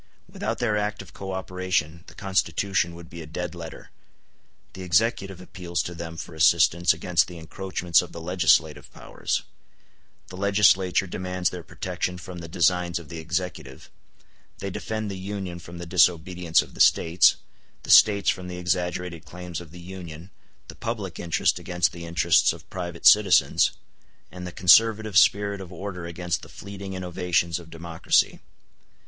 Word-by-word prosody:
Without -, -, -4 dB
their 110 Hz, -3 st, 0 dB
active 105 Hz, -5 st, -4 dB
co 95 Hz, -1 st, -6 dB
operation 90 Hz, -4 st, -2 dB
the -, -, -14 dB
Constitution 95 Hz, -2 st, 0 dB
would 85 Hz, 0 st, -11 dB
be 85 Hz, 0 st, -9 dB
a 80 Hz, -, -9 dB
dead 90 Hz, +2 st, -5 dB
letter: 85 Hz, -2 st, -10 dB, 0.8 s
the 95 Hz, -, -9 dB
Executive 95 Hz, +1 st, 0 dB
appeals 90 Hz, -2 st, -4 dB
to 85 Hz, -, -6 dB
them 85 Hz, -1 st, -7 dB
for 85 Hz, -, -7 dB
assistance 85 Hz, +2 st, +4 dB
against 90 Hz, -3 st, +1 dB
the 90 Hz, -, -10 dB
encroachments 85 Hz, 0 st, 0 dB
of 90 Hz, -, -9 dB
the 85 Hz, -, -8 dB
legislative 80 Hz, -4 st, +1 dB
powers; -, -, -3 dB, 0.9 s
the 90 Hz, -, -9 dB
Legislature 95 Hz, -2 st, +3 dB
demands 90 Hz, 0 st, -2 dB
their 90 Hz, -, -6 dB
protection 90 Hz, +1 st, -4 dB
from 90 Hz, +1 st, -9 dB
the 85 Hz, -, -8 dB
designs 85 Hz, +1 st, +1 dB
of 85 Hz, -4 st, -9 dB
the 85 Hz, -, -6 dB
Executive; 80 Hz, -4 st, -5 dB, 0.7 s
they 100 Hz, -, -5 dB
defend 110 Hz, +1 st, -4 dB
the 95 Hz, -, -6 dB
Union 95 Hz, -2 st, -5 dB
from 85 Hz, 0 st, -11 dB
the 85 Hz, -, -7 dB
disobedience 85 Hz, -1 st, +2 dB
of -, -, -16 dB
the -, -, -2 dB
States, 85 Hz, +2 st, +5 dB, 0.5 s
the -, -, -2 dB
States 100 Hz, -2 st, +6 dB
from 90 Hz, 0 st, -7 dB
the 90 Hz, 0 st, -6 dB
exaggerated 90 Hz, -1 st, -2 dB
claims 90 Hz, -1 st, -7 dB
of 85 Hz, -, -12 dB
the 90 Hz, +3 st, -12 dB
Union, 90 Hz, -1 st, -9 dB, 0.4 s
the -, -, -9 dB
public 110 Hz, -6 st, -5 dB
interest 85 Hz, -1 st, +1 dB
against 90 Hz, -1 st, 0 dB
the 85 Hz, 0 st, -9 dB
interests 85 Hz, -1 st, +3 dB
of -, -, -14 dB
private 85 Hz, -2 st, -6 dB
citizens, 105 Hz, -3 st, +6 dB, 0.6 s
and 90 Hz, 0 st, -7 dB
the -, -, -6 dB
conservative 110 Hz, +4 st, +4 dB
spirit 100 Hz, -1 st, +4 dB
of 95 Hz, -1 st, -10 dB
order 90 Hz, -1 st, -6 dB
against 85 Hz, +1 st, -3 dB
the -, -, -12 dB
fleeting 100 Hz, 0 st, -8 dB
innovations 90 Hz, -2 st, -1 dB
of 85 Hz, -1 st, -13 dB
democracy. 80 Hz, 0 st, 0 dB
90 Hz, 160 wpm, -25 LUFS, 85-95 Hz, 0.9 s, States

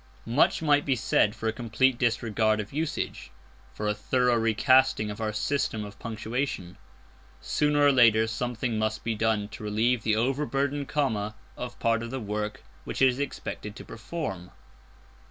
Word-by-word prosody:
Much 125 Hz, +7 st, +2 dB
might 145 Hz, -1 st, +4 dB
be 135 Hz, -, +1 dB
said 110 Hz, -2 st, +2 dB
for 110 Hz, 0 st, -4 dB
a 110 Hz, -, +1 dB
complete 120 Hz, +2 st, +1 dB
disregard 110 Hz, -2 st, +1 dB
of 105 Hz, +2 st, -5 dB
usage, 155 Hz, +1 st, -3 dB, 0.4 s
for 105 Hz, -, -4 dB
a 105 Hz, -, +2 dB
thorough 125 Hz, +4 st, +1 dB
recasting 115 Hz, 0 st, +3 dB
of 105 Hz, +2 st, -7 dB
our 110 Hz, -1 st, -1 dB
system 110 Hz, -1 st, -1 dB
of 100 Hz, -1 st, -11 dB
punctuation. 110 Hz, -4 st, -3 dB, 0.6 s
Sooner 150 Hz, 0 st, +1 dB
or 145 Hz, -, +7 dB
later 115 Hz, -4 st, +5 dB
something 115 Hz, 0 st, -2 dB
must 110 Hz, 0 st, -1 dB
be 115 Hz, -, -1 dB
done 110 Hz, -1 st, 0 dB
to 110 Hz, -, -10 dB
relieve 110 Hz, +3 st, +1 dB
the 110 Hz, 0 st, +1 dB
overburdened 140 Hz, +3 st, 0 dB
comma 105 Hz, -8 st, -1 dB, 0.2 s
of 125 Hz, -1 st, -6 dB
part 115 Hz, -1 st, +1 dB
of 115 Hz, -, -5 dB
the 130 Hz, +2 st, -4 dB
work 105 Hz, -1 st, -4 dB, 0.2 s
which -, -, -5 dB
it 135 Hz, -, +6 dB
is 125 Hz, +1 st, -3 dB
expected 110 Hz, -6 st, -5 dB
to 125 Hz, -, -10 dB
perform. 110 Hz, -, -5 dB
115 Hz, 165 wpm, -27 LUFS, 110-130 Hz, 0.6 s, or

